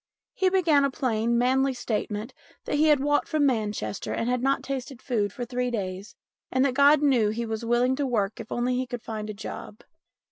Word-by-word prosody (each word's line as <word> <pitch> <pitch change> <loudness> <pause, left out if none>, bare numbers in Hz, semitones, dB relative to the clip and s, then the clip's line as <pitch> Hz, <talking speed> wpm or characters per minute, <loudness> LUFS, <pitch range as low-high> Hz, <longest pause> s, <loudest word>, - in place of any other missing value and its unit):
He 380 -1 +2
began 335 -7 +3
a 280 - +2
plain, 235 -3 0
manly 260 +2 +2
statement 215 -2 -3 0.3
that - - -1
he 310 +1 +4
had 300 -2 +5
walked 290 +1 +1
from 305 -2 +1
Manchester 215 -6 -1
and 230 - -2
had 250 0 0
not 275 +1 +1
tasted 270 -2 -5
food 215 -7 -1
for 245 +4 -5
three 250 +1 -2
days, 195 -3 -5 0.4
and 260 +1 +2
that 265 - +1
God 285 +2 +5
knew 245 -7 +3
he 230 +2 -2
was 220 0 -4
willing 240 +2 +2
to 285 -1 0
work 215 -4 -1
if 225 - -9
only 245 +1 0
he 255 0 -1
could 245 -1 -6
find 215 -1 -5
a - - -4
job. 210 0 -8
245 Hz, 210 wpm, -26 LUFS, 220-275 Hz, 0.4 s, had